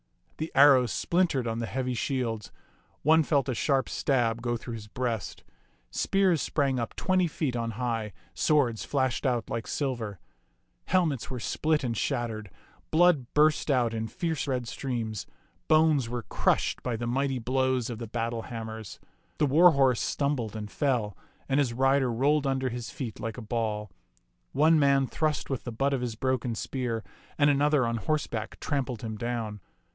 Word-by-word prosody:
The 160 Hz, +1 st, -4 dB
arrows 135 Hz, -4 st, +6 dB
splintered 170 Hz, -8 st, +1 dB
on 115 Hz, 0 st, -2 dB
the 115 Hz, -, -2 dB
heavy 125 Hz, +4 st, -2 dB
shields; 115 Hz, -3 st, -2 dB, 0.5 s
one 160 Hz, +2 st, +6 dB
felt 140 Hz, -4 st, +1 dB
a 130 Hz, -, 0 dB
sharp 135 Hz, +1 st, +1 dB
stab 120 Hz, -4 st, 0 dB
go 120 Hz, 0 st, -1 dB
through 120 Hz, +1 st, -7 dB
his 110 Hz, -2 st, -7 dB
breast; 115 Hz, -5 st, -3 dB, 0.5 s
spears 190 Hz, -6 st, +2 dB
sprang 135 Hz, -4 st, 0 dB
up 115 Hz, -, -4 dB
twenty 185 Hz, -2 st, +2 dB
feet 150 Hz, -5 st, -2 dB
on 115 Hz, -1 st, -2 dB
high; 115 Hz, -4 st, -2 dB, 0.2 s
swords 130 Hz, -8 st, +2 dB
flashed 130 Hz, -1 st, 0 dB
out 120 Hz, -3 st, -1 dB
like 115 Hz, 0 st, -3 dB
silver; 120 Hz, -8 st, -2 dB, 0.7 s
helmets 160 Hz, -9 st, +1 dB
were 125 Hz, -, -4 dB
split 155 Hz, +5 st, 0 dB
and 120 Hz, -2 st, -1 dB
shattered; 110 Hz, -2 st, -2 dB, 0.4 s
blood 160 Hz, -6 st, +3 dB
burst 155 Hz, +1 st, +3 dB
out 125 Hz, -4 st, +2 dB
in 110 Hz, 0 st, -2 dB
fierce 160 Hz, +4 st, -2 dB
red 125 Hz, -3 st, -1 dB
streams; 115 Hz, -6 st, -4 dB, 0.4 s
bones 155 Hz, -6 st, +4 dB
were 120 Hz, -1 st, -3 dB
crushed -, -, 0 dB
by 125 Hz, -2 st, -2 dB
the 120 Hz, +1 st, -4 dB
mighty 135 Hz, +2 st, 0 dB
blows 130 Hz, 0 st, 0 dB
of 115 Hz, -, -6 dB
the 115 Hz, -, -5 dB
battle 115 Hz, +1 st, -2 dB
ham 115 Hz, -1 st, -6 dB
mers. 110 Hz, -2 st, -8 dB, 0.4 s
The -, -, +3 dB
war 165 Hz, +5 st, +6 dB
horse 130 Hz, -4 st, +3 dB
stumbled 135 Hz, -7 st, -1 dB
and 105 Hz, -1 st, -6 dB
fell, 120 Hz, -8 st, 0 dB, 0.3 s
and 135 Hz, +1 st, +2 dB
his 130 Hz, -5 st, +1 dB
rider 135 Hz, 0 st, +2 dB
rolled 140 Hz, +5 st, +2 dB
under 130 Hz, -1 st, 0 dB
his 120 Hz, -1 st, -5 dB
feet 120 Hz, -3 st, -6 dB
like 115 Hz, 0 st, -4 dB
a 120 Hz, -, -6 dB
ball. 105 Hz, -3 st, -2 dB, 0.6 s
One 155 Hz, +2 st, +4 dB
man 140 Hz, -1 st, +4 dB
thrust 155 Hz, +1 st, -1 dB
with 130 Hz, -, -2 dB
the 120 Hz, -, -5 dB
butt 135 Hz, +5 st, 0 dB
of 130 Hz, -, 0 dB
his 120 Hz, -3 st, -3 dB
broken 125 Hz, -1 st, -1 dB
spear, 115 Hz, -2 st, -3 dB, 0.3 s
and 145 Hz, -1 st, +5 dB
another 145 Hz, -1 st, +3 dB
on 115 Hz, 0 st, -1 dB
horse 150 Hz, +8 st, 0 dB
back 110 Hz, -1 st, -5 dB
trampled 130 Hz, -6 st, -2 dB
him 110 Hz, -1 st, -4 dB
down. 115 Hz, -2 st, -3 dB
125 Hz, 170 wpm, -28 LUFS, 115-140 Hz, 0.7 s, arrows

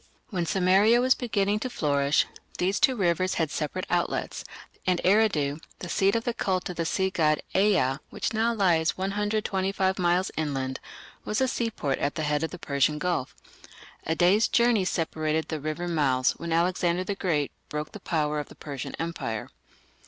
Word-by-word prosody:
When 175 Hz, -4 st, -1 dB
Sumeria 195 Hz, +6 st, +4 dB
was 255 Hz, +1 st, +4 dB
beginning 210 Hz, -4 st, 0 dB
to 255 Hz, -, -3 dB
flourish, 145 Hz, -, +2 dB, 0.3 s
these 190 Hz, +3 st, +1 dB
two 260 Hz, -, +4 dB
rivers 185 Hz, -2 st, +1 dB
had 160 Hz, -3 st, 0 dB
separate 160 Hz, +4 st, -3 dB
outlets, 175 Hz, -1 st, -1 dB, 0.4 s
and 180 Hz, -2 st, +2 dB
Eridu, 180 Hz, -8 st, +3 dB, 0.2 s
the 175 Hz, -, -7 dB
seat 195 Hz, +3 st, +2 dB
of 230 Hz, -, 0 dB
the 240 Hz, -, -1 dB
cult 185 Hz, -5 st, -1 dB
of 180 Hz, -, -10 dB
the 165 Hz, -1 st, -1 dB
sea 190 Hz, +3 st, 0 dB
god 155 Hz, -5 st, +2 dB, 0.2 s
Ea, 190 Hz, -10 st, +3 dB
which -, -, -3 dB
now 225 Hz, +2 st, +2 dB
lies 175 Hz, -7 st, +2 dB
125 195 Hz, -1 st, 0 dB
miles 180 Hz, +1 st, +2 dB
inland, 135 Hz, -4 st, -2 dB, 0.4 s
was 210 Hz, -, -1 dB
a 260 Hz, -, +3 dB
seaport 225 Hz, -, -2 dB
at 140 Hz, -, -1 dB
the 155 Hz, -, -2 dB
head 150 Hz, 0 st, 0 dB
of 160 Hz, -, -1 dB
the 180 Hz, -, -8 dB
Persian 145 Hz, -2 st, +1 dB
Gulf. 150 Hz, -5 st, -2 dB, 0.7 s
A 160 Hz, -, -1 dB
day's 185 Hz, +6 st, +4 dB
journey 235 Hz, -5 st, +3 dB
separated 160 Hz, -2 st, -1 dB
the 155 Hz, -, -2 dB
river 155 Hz, +4 st, -3 dB
mouths 135 Hz, -6 st, +2 dB
when 170 Hz, 0 st, -6 dB
Alexander 175 Hz, +1 st, +1 dB
the 200 Hz, -, -2 dB
Great 165 Hz, -7 st, -1 dB, 0.2 s
broke 150 Hz, 0 st, -4 dB
the 210 Hz, -, -9 dB
power 150 Hz, -4 st, -1 dB
of 145 Hz, -, -6 dB
the -, -, -13 dB
Persian 140 Hz, -4 st, -6 dB
Empire. 140 Hz, -10 st, -4 dB
175 Hz, 175 wpm, -27 LUFS, 155-195 Hz, 0.7 s, Sumeria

